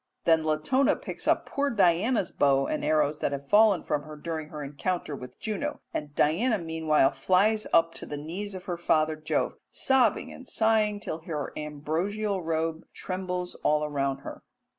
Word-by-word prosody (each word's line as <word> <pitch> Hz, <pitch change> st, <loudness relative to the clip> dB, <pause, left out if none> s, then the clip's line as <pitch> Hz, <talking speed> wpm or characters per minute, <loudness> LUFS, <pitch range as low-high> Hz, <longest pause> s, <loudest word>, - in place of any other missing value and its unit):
Then 160 Hz, -1 st, +4 dB
Latona 155 Hz, -, +2 dB
picks -, -, -7 dB
up -, -, +3 dB
poor 285 Hz, 0 st, -1 dB
Diana's 200 Hz, +1 st, +2 dB
bow 135 Hz, -1 st, +3 dB
and 155 Hz, -, -2 dB
arrows 150 Hz, 0 st, +2 dB
that -, -, -1 dB
have 140 Hz, 0 st, -5 dB
fallen 210 Hz, +1 st, +5 dB
from 145 Hz, -, -1 dB
her 155 Hz, +1 st, -10 dB
during 155 Hz, 0 st, -5 dB
her 150 Hz, -1 st, -6 dB
encounter 150 Hz, +2 st, -3 dB
with 125 Hz, -1 st, -10 dB
Juno, 260 Hz, +7 st, -3 dB
and 145 Hz, -1 st, -4 dB
Diana 215 Hz, +10 st, +2 dB
meanwhile 160 Hz, -5 st, +2 dB
flies 190 Hz, +10 st, +2 dB
up 165 Hz, 0 st, +4 dB
to -, -, -7 dB
the 145 Hz, -, -5 dB
knees 185 Hz, +7 st, -5 dB
of 185 Hz, -, -8 dB
her 175 Hz, -2 st, -3 dB
father 155 Hz, -2 st, +2 dB
Jove, 155 Hz, 0 st, -2 dB
sobbing 260 Hz, -5 st, +2 dB
and 260 Hz, -, -12 dB
sighing 215 Hz, -2 st, +2 dB
till 160 Hz, -, -4 dB
her 155 Hz, -3 st, -5 dB
ambrosial 170 Hz, +8 st, -2 dB
robe 160 Hz, 0 st, -2 dB
trembles 180 Hz, -1 st, -4 dB
all 150 Hz, 0 st, +2 dB
around 140 Hz, -2 st, -1 dB
her. -, -, -8 dB
165 Hz, 170 wpm, -27 LUFS, 150-205 Hz, -, fallen